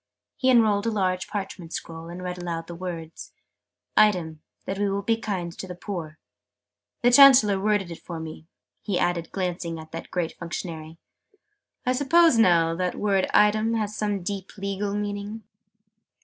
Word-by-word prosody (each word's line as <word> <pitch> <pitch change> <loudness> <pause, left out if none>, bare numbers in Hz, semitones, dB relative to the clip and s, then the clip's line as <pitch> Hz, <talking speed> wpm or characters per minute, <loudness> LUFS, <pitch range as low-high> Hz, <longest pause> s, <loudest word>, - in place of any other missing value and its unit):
He 260 - +1
unrolled 220 -4 +4
a - - +1
large 185 -3 0
parchment 190 -5 -6
scroll, 165 0 -6
and 175 +1 -7
read 180 0 -4
aloud 170 -2 -4
the 170 - -8
words 170 -2 -7 0.6
"'item, 170 -7 +3 0.2
that 195 +1 -4
we 205 -1 +1
will 200 +1 -2
be 225 +3 +2
kind 190 -6 -4
to 190 - -7
the 180 - -7
poor.' 170 -5 -6 0.9
The 245 - +5
Chancellor 245 -7 +8
worded 205 -3 0
it 165 - -9
for 170 -2 -7
me," 160 0 -8 0.3
he 200 -4 -1
added, 175 -2 -1
glancing 175 -3 -3
at 160 0 -11
that 165 - -7
great 175 -3 -2
Functionary. 165 -2 -6 0.9
"I 250 - +2
suppose, 290 0 +4
now, 170 -5 +4
that 180 +1 -2
word 195 -2 +1
'item' 215 +2 +3
has 215 -1 -2
some 205 -3 -2
deep 195 +1 -5
legal 200 +1 -3
meaning?" 205 +1 -4
190 Hz, 165 wpm, -25 LUFS, 170-210 Hz, 0.9 s, Chancellor